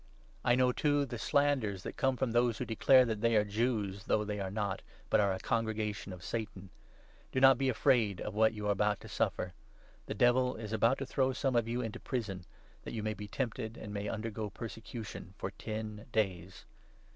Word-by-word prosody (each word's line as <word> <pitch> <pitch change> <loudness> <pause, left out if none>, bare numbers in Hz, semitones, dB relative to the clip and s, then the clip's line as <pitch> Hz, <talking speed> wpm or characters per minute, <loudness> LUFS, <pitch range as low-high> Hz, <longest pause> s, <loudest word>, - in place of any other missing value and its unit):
I 120 - +4
know, 125 0 +4
too, 145 +2 +2
the 120 -3 -6
slanders 130 -10 +1
that - - -6
come 130 -1 +1
from 130 -2 0
those 120 -1 +2
who - - -3
declare 130 +3 +5
that 110 -3 -2
they 115 0 +3
are 105 - +5
Jews, 105 -2 -1
though 105 - +2
they 105 0 -3
are 95 -1 -2
not, 100 -1 -2 0.3
but - - +5
are 100 -2 +3
a 95 - -1
Congregation 110 -2 -2
of 90 -1 -9
Satan. 100 -4 -5 0.6
Do 130 - 0
not 135 -1 +7
be 135 - +2
10 - - +4
afraid 115 -6 +2
of 105 - -4
what 110 +1 +4
you 105 -1 -4
are - - +3
about 105 0 +1
to - - -10
suffer. 90 - -1 0.5
The - - -3
Devil 125 +1 +3
is 110 -1 -6
about 115 +4 +3
to 135 - -3
throw 130 0 +1
some 130 0 0
of 115 -1 +2
you 120 +2 -1
into 115 -3 -4
prison, 100 -8 -4 0.4
that - - -7
you 110 - -3
may 110 0 -1
be 105 0 -7
tempted, 115 0 -3
and 105 -1 -7
may 100 0 -3
undergo 110 -1 -3
persecution 115 +1 -7
for - - -4
ten 110 0 -6
days. 95 -5 -1
110 Hz, 210 wpm, -33 LUFS, 105-125 Hz, 0.6 s, not